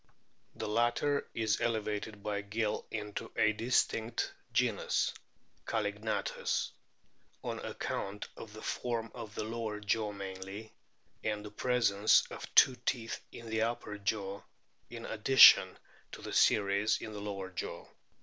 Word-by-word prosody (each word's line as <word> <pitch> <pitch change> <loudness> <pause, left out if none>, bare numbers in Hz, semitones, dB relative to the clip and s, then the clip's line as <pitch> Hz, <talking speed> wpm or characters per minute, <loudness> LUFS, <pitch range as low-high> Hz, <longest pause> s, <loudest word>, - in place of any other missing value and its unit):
The - - -4
latter 120 +6 +1
is 110 -2 +1
elevated 110 -2 -2
by 100 -1 -1
Gill 105 +1 -2
into 105 -2 -5
a 110 - +3
distinct 115 0 0 0.2
genus, - - +1 0.5
Callignathus, 105 0 -1 0.7
on - - -3
account 100 +1 -4
of 110 - -10
the 110 - -10
form 115 -2 -2
of 110 -2 -8
the - - -2
lower 110 -1 -4
jaw 105 +1 0
mainly, 95 +2 -7 0.5
and 105 -1 -2
the 105 - -8
presence 110 -3 +3
of - - -7
two 130 - +7
teeth 120 -2 -2
in 115 - -10
the 110 0 -1
upper 110 -2 -2
jaw 100 -1 -2 0.5
in - - -8
addi - - -2
tion - - +10 0.4
to - - -9
the - - -6
series 100 +1 +3
in 110 - -7
the 105 - -6
lower 100 -2 -5
jaw. 90 - -5
105 Hz, 135 wpm, -32 LUFS, 100-115 Hz, 0.7 s, tion